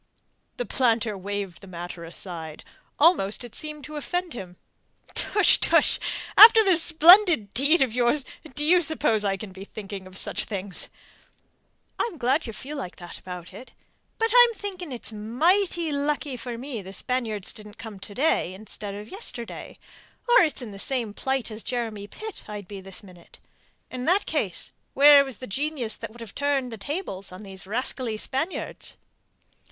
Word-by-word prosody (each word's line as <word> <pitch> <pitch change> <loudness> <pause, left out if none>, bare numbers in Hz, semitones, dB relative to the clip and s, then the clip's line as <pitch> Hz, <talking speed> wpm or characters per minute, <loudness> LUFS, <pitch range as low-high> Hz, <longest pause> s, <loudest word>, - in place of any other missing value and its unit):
The - - -2
planter 230 -5 +1
waved 195 -2 -5
the 195 - -12
matter 175 -1 -7
aside. 165 -2 -7 0.3
Almost 285 - +3
it 240 - -10
seemed 300 -1 -4
to 300 +2 -7
offend 355 +3 -3
him. 180 -6 -9 0.6
"Tush! 415 -3 +4
Tush! - - +5 0.4
After 445 +1 +10
this 370 -5 +4
splendid 335 - +6
deed 285 +5 +4
of 250 -4 -3
yours, 250 +3 +2 0.3
do 295 - +2
you 355 +3 +5
suppose 290 -9 +1
I 195 -1 0
can 195 0 -8
be 190 +1 -10
thinking 200 -2 -8
of 185 0 -9
such - - -1
things?" 195 -2 -4 1.1
"I'm 445 -8 -2
glad 265 +3 +1
ye 225 - -6
feel 285 +7 -7
like 215 -10 -6
that 175 -1 -10
about 180 0 -9
it. 245 +7 -12 0.4
But 455 -1 0
I'm 485 -1 +8
thinking 370 -7 -6
it's 235 -3 -5
mighty 325 - +1
lucky 285 -1 -1
for 240 0 -6
me 250 -3 -6
the 190 0 -10
Spaniards 225 -5 -2
didn't 210 0 -9
come 220 -3 -9
to 200 +1 -10
day 255 - +1
instead 205 0 -7
of 210 +1 -8
yesterday, 245 - -4 0.5
or 485 +1 +7
it's 305 -6 0
in 225 - -8
the 195 - -10
same 235 -3 -2
plight 265 -1 -2
as 215 +1 -7
Jeremy 220 -5 -4
Pitt 435 - -8
I'd 205 -3 -7
be 200 -1 -8
this 190 +2 -6
minute. 180 -3 -16 0.5
And 255 - -6
in 250 - -4
that 375 +4 +3
case 220 - -2 0.2
where 285 +1 +8
was 265 -5 -8
the 255 - -8
genius 265 -1 -3
that - - -7
would 235 +2 -14
have 225 -3 -9
turned 280 -3 -1
the 225 - -7
tables 200 - -4
on 185 +3 -10
these 190 -1 -6
rascally 235 +1 -2
Spaniards?" 270 - -4
240 Hz, 175 wpm, -25 LUFS, 200-300 Hz, 1.1 s, After